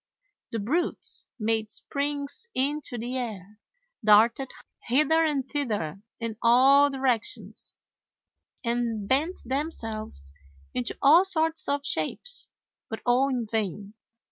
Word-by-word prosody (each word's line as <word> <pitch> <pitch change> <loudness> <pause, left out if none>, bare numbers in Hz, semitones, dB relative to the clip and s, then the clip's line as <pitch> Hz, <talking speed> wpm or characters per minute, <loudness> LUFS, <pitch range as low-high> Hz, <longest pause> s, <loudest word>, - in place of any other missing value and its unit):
The 230 - -2
brutes 300 - 0
made 220 -1 -1
springs 285 - -3
into 280 -1 -1
the 245 +3 -3
air, 210 -3 -7 0.4
darted 225 +5 +5 0.4
hither 305 +6 +3
and 285 -4 0
thither 210 - -3 0.2
in 230 -2 -4
all 270 +4 +6
directions, 260 -4 -2 0.9
and 235 -3 -1
bent 305 - +1
themselves 225 - -4 0.4
into 125 - -2
all 320 +6 +7
sorts 325 -4 +2
of 285 0 -1
shapes - - -2 0.4
but 220 - -6
all 255 +3 +3
in 250 -3 -1
vain. 210 -2 -3
250 Hz, 110 wpm, -27 LUFS, 220-285 Hz, 0.9 s, all